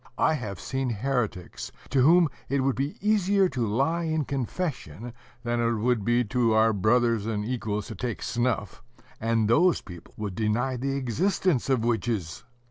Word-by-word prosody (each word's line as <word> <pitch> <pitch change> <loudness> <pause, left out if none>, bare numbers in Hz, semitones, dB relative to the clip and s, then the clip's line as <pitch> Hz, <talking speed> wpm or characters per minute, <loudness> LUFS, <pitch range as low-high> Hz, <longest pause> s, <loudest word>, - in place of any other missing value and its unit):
I - - +3
have 105 - -4
seen 130 -1 -2
heretics, 115 -5 -3 0.2
to 135 - +3
whom 170 +5 +6 0.2
it 140 +1 +1
would 135 0 +1
be 140 +3 -3
easier 200 -2 +3
to 120 -7 -1
lie 140 +11 0
in 155 -2 0
confession 125 - -4 0.3
than 120 0 -1
it 115 0 +2
would 120 +1 +1
to 120 -3 +2
our 110 0 +4
brothers 115 +1 +2
and 105 -2 -2
equals 110 -4 -2
to - - -5
take 120 +3 -4
snuff, 120 -5 -1 0.4
and 115 -1 +1
those 165 +10 +4
people 85 -3 -12
would 105 -3 -4
deny 115 +6 0
the 135 +2 -2
existence 140 - 0
of 125 -4 +2
witches! 110 -8 -1
120 Hz, 160 wpm, -26 LUFS, 110-135 Hz, 0.4 s, whom